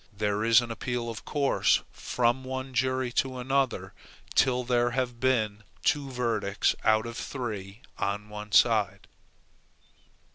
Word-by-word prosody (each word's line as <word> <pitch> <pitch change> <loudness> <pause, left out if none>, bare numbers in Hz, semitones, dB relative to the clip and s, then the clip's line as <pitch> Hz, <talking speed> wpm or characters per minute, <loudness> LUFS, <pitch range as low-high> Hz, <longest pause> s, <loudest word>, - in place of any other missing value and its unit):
There 105 0 -1
is 115 +2 +6
an 120 -1 -5
appeal 120 0 -3
of 110 - -9
course 140 -2 +2
from 120 +1 0
one 130 0 -5
jury 130 0 0
to 130 -1 -7
another, 135 +1 -1 0.4
till 125 -1 +3
there 120 0 +2
have 125 -2 -1
been 110 -5 +1 0.2
two 145 -2 +1
verdicts 115 -6 0
out 110 +1 +3
of 115 0 -6
three 110 -4 -5 0.2
on 105 +1 -2
one 105 0 -8
side. 105 -4 +3
120 Hz, 135 wpm, -28 LUFS, 105-130 Hz, 0.4 s, is